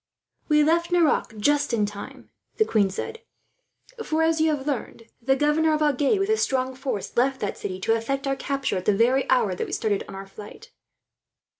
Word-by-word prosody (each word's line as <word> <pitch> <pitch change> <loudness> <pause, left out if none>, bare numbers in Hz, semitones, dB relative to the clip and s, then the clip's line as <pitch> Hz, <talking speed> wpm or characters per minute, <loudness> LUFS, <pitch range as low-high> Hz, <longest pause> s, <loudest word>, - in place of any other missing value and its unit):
"We 300 -1 +4
left 335 +3 +1
Nerac 315 -9 +2
just 290 +4 +1
in 210 -2 +1
time," 205 0 -9 0.3
the 435 - +4
queen 205 - +2
said; 450 - -6 0.8
"for, 320 -3 0
as 320 0 +2
we 315 - +3
have 295 -4 -1
learned, 270 -5 -4 0.2
the 270 +3 +2
governor 305 +3 +2
of 305 - 0
Agen, 290 +6 +2
with 390 +1 -1
a 440 - +3
strong 260 -7 0
force, 260 -6 -5
left 265 +2 +1
that 205 - -2
city 185 -1 -5
to 225 - +2
effect 270 +5 -2
our 275 0 0
capture 275 -7 -2
at 185 - -5
the 205 -2 +2
very 255 +4 +2
hour 235 -7 +3
that 180 - -4
we - - -8
started 210 -3 0
on - - -9
our 195 0 -7
flight." 210 - -12
270 Hz, 200 wpm, -24 LUFS, 220-310 Hz, 0.8 s, We